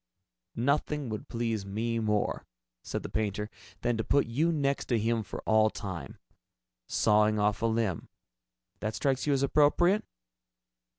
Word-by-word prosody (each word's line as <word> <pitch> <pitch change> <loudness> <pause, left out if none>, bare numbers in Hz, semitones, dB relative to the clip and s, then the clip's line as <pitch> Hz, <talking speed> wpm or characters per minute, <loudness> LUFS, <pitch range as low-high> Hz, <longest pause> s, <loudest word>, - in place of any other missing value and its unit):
"Nothing 140 +2 0
would 110 -1 -5
please 115 -3 -1
me 115 +4 -2
more," 105 -2 0 0.3
said - - -4
the - - -4
painter, 105 0 -2 0.3
"than 120 -1 +1
to 115 - -1
put 140 - +3
you 150 +9 +1
next 140 -3 0
to 120 - +1
him 115 +1 +1
for 105 - -7
all 110 0 +4
time. 95 -5 -6 0.7
Sawing 105 0 +3
off 105 0 +1
a 115 - +2
limb 110 -6 -1 0.7
that 110 0 -3
strikes 135 +5 0
you 145 - +4
as 135 0 +1
appropriate?" 155 +8 +4
115 Hz, 150 wpm, -29 LUFS, 105-140 Hz, 0.7 s, all